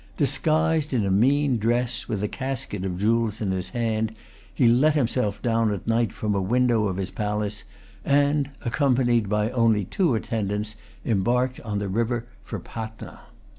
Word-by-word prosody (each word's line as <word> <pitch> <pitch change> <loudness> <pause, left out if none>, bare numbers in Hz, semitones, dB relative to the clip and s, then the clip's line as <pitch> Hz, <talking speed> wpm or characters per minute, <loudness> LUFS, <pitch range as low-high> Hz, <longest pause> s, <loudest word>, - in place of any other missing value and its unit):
Disguised 155 +1 +1
in 110 -5 +1
a 95 - 0
mean 130 +5 +3
dress, 120 +3 0
with 105 -2 -2
a - - +1
casket 130 -6 -4
of 90 -2 -3
jewels 110 +1 +1
in 100 -3 -1
his 95 -1 -1
hand, 110 -2 -1 0.4
he 125 - +3
let 135 +6 +4
himself 120 -6 0
down 115 -2 +2
at 100 - -4
night 115 0 +1
from 105 -1 -2
a 100 - 0
window 120 +1 +2
of 95 -2 -3
his 95 -1 -3
palace, 105 -1 -2 0.4
and 145 0 +2 0.2
accompanied 120 -4 +2
by 105 +2 +1
only 115 -5 +2
two 165 - +1
attendants, 105 -2 -2 0.3
embarked 125 +4 +1
on 105 -3 -4
the 100 0 -2
river 115 +4 -1 0.2
for 110 - -5
Patna. 110 +4 -8
115 Hz, 165 wpm, -25 LUFS, 105-125 Hz, 0.4 s, let